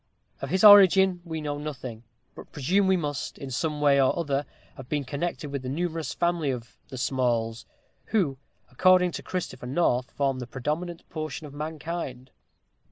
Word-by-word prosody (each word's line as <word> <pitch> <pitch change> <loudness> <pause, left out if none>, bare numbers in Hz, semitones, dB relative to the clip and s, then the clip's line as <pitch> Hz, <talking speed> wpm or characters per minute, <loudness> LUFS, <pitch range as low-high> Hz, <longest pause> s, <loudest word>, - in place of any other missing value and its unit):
Of - - -4
his 190 +2 +1
origin 190 -3 +8
we 160 -2 -5
know 145 -1 -3
nothing; 130 -6 -6 0.3
but - - -12
presume 190 +8 +1
he 190 - +4
must, 145 -4 -4
in 135 -1 -7
some 150 +3 -2
way 140 -1 +5
or 130 - +2
other, 145 -4 -1 0.3
have 130 -1 -11
been 145 -2 -1
connected 150 +1 -4
with 140 -2 -3
the 130 - -5
numerous 165 0 -2
family 170 -4 0
of 125 -2 -5
"the 130 - -7
Smalls," 120 -3 -1 0.4
who, 165 -12 0 0.3
according 180 +5 +4
to - - -6
Christopher 130 -9 -5
North, 130 -3 +1
form 135 -2 -1
the 125 - -6
predominant 155 +7 -4
portion 155 -1 -5
of 145 - -10
mankind. 150 -4 -5
150 Hz, 165 wpm, -26 LUFS, 130-170 Hz, 0.4 s, origin